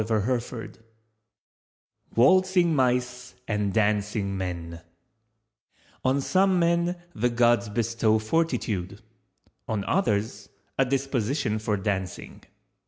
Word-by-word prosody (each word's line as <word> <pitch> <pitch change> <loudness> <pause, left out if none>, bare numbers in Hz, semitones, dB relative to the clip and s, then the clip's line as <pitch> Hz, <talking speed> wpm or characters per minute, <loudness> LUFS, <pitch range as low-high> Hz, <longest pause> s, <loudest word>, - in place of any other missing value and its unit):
WALTZING 180 +6 +4
MICE 125 -1 0
AND 105 -2 0
DANCING 105 -1 0
MEN 85 -3 -5 1.2
"On 130 +2 +2
some 185 +6 +2
men 170 +1 +2 0.2
the 125 -1 0
Gods 120 -1 +2
bestow 115 0 +1
Fortitude, 110 - -2 0.6
On 105 -3 -2
others 105 - -1 0.3
a 135 - +5
disposition 130 -3 -1
for 105 -1 -1
Dancing." 95 -2 -4
115 Hz, 85 wpm, -26 LUFS, 105-135 Hz, 1.2 s, a